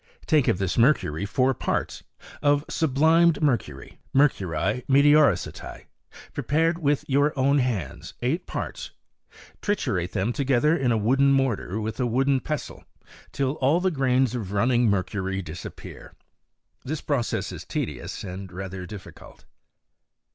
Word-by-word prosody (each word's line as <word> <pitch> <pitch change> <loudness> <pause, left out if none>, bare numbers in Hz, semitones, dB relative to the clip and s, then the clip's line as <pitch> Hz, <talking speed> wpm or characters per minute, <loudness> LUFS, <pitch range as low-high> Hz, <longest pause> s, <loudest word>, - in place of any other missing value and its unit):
Take 150 -4 +3
of - - +2
this 95 +3 -1
mercury 105 - +2
four 130 +4 +2
parts; - - -3 0.4
of 145 0 +2
sublimed 160 +2 +3
mercury* 115 - -2 0.2
{mercuHi 125 - +1
meteoresati), 140 - +3 0.5
prepared 165 +3 0
with 145 -3 0
your 145 +2 +2
own 140 +2 +3
hands, 105 - -3
eight 140 +8 -1
parts; - - -5 0.7
triturate 90 - -1
them 105 +4 0
together 140 +3 +2
in 130 -6 +1
a 115 - +2
wooden 135 +6 +3
mortar 125 -7 0
with 110 +3 -4
a 125 - +1
wooden 135 +3 +2
pestle, 150 +3 -5 0.5
till 135 -2 0
all 140 +6 +2
the 185 +1 +1
grains 130 -4 +1
of 110 -6 -4
running 120 +3 +3
mercury 95 0 -1
disappear. 80 +1 -10 0.7
This 150 +4 -4
process 135 -6 -1
is - - -8
tedious - - -5
and 95 0 -7
rather 95 0 -6
difficult. 105 -2 -12
130 Hz, 130 wpm, -25 LUFS, 100-145 Hz, 0.7 s, Take